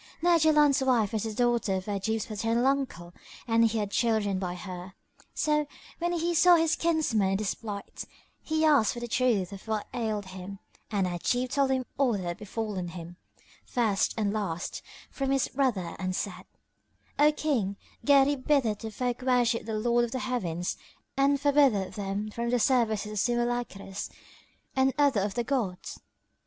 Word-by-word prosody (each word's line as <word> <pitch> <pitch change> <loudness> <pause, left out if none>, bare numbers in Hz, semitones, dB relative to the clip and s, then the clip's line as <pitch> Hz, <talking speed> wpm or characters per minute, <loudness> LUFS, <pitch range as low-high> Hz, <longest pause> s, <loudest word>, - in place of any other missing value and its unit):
Now 345 0 +4
Jaland's 300 -3 +4
wife 235 -6 +2
was 220 0 -1
the 220 - -3
daughter 240 -5 +1
of 185 0 -3
Ajib's 210 +2 -2
paternal 230 +1 0
uncle 260 -11 -1 0.3
and 230 0 +4
he 225 0 +1
had 205 -2 -2
children 215 -4 +1
by 180 -2 -3
her; 180 0 -8 0.4
so, 300 -1 +1 0.3
when 345 +1 0
he 340 0 0
saw 350 +2 +6
his 325 -1 +2
kinsman 310 - +1
in 195 - +1
this 210 -1 -1
plight, 205 -3 -7 0.4
he 315 0 0
asked 285 -9 +4
for 240 - -6
the 240 - -5
truth 235 -6 +1
of 200 +2 -10
what 215 -2 -1
ailed 215 -4 -2
him 185 +1 -8 0.3
and 200 -3 0
Ajib 245 +8 -1
told 275 -1 +2
him 260 -1 0
all 265 -4 +3
that 195 -3 -2
had 175 -1 -3
befallen 210 -3 -4
him, 175 0 -9 0.5
first 220 -5 0
and 210 -2 0
last, 185 -6 -3 0.3
from 270 -1 -2
his 270 -1 +2
brother 235 -11 -1
and 185 -1 -2
said, 190 -1 -4 0.7
"O 300 +1 +6
King, 245 -11 -1 0.3
Gharib 280 -1 +4
biddeth 245 -8 +2
the 225 - -5
folk 245 +3 -3
worship 245 -3 +1
the 220 - -2
Lord 240 +2 +2
of 240 - -1
the - - -1
Heavens 180 -9 -2 0.4
and 275 +1 +3
forbiddeth 275 -9 +3
them 205 +1 -3
from 235 +2 -3
the 245 - +2
service 225 -4 +2
of 210 0 -4
simulacres 240 -5 -2 0.7
and 265 0 +2
other 280 -8 +3
of 195 0 -2
the 240 - 0
gods." 225 -9 -3
230 Hz, 170 wpm, -28 LUFS, 200-265 Hz, 0.7 s, saw